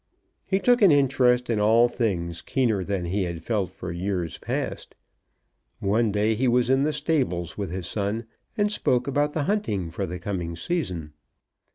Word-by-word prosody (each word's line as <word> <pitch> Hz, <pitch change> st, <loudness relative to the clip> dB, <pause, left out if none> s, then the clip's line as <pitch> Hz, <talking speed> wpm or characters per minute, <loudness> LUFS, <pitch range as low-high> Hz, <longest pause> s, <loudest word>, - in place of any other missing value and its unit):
He 190 Hz, -, +2 dB
took 245 Hz, +4 st, +3 dB
an 195 Hz, -5 st, +7 dB
interest 125 Hz, -3 st, +3 dB
in 115 Hz, -3 st, 0 dB
all 115 Hz, +3 st, +5 dB
things 85 Hz, -9 st, -2 dB
keener 115 Hz, -7 st, 0 dB
than 95 Hz, -2 st, -2 dB
he 95 Hz, +4 st, -1 dB
had 85 Hz, -1 st, -5 dB
felt 100 Hz, -2 st, -1 dB
for 95 Hz, -1 st, -7 dB
years 90 Hz, -2 st, -3 dB
past. -, -, -4 dB, 0.8 s
One 105 Hz, +3 st, +1 dB
day 105 Hz, +2 st, +2 dB
he 125 Hz, +4 st, 0 dB
was 125 Hz, +1 st, +3 dB
in 135 Hz, +1 st, +4 dB
the 150 Hz, +2 st, +2 dB
stables 130 Hz, -, -1 dB
with 100 Hz, -2 st, -4 dB
his 90 Hz, +1 st, -4 dB
son, 105 Hz, +4 st, -2 dB, 0.3 s
and 205 Hz, 0 st, +2 dB
spoke 125 Hz, -11 st, +1 dB
about 145 Hz, +2 st, 0 dB
the 155 Hz, -, +1 dB
hunting 110 Hz, -, -1 dB
for -, -, -3 dB
the 90 Hz, +2 st, -5 dB
coming 90 Hz, -3 st, -4 dB
season. 90 Hz, -, -3 dB
110 Hz, 175 wpm, -25 LUFS, 90-135 Hz, 0.8 s, an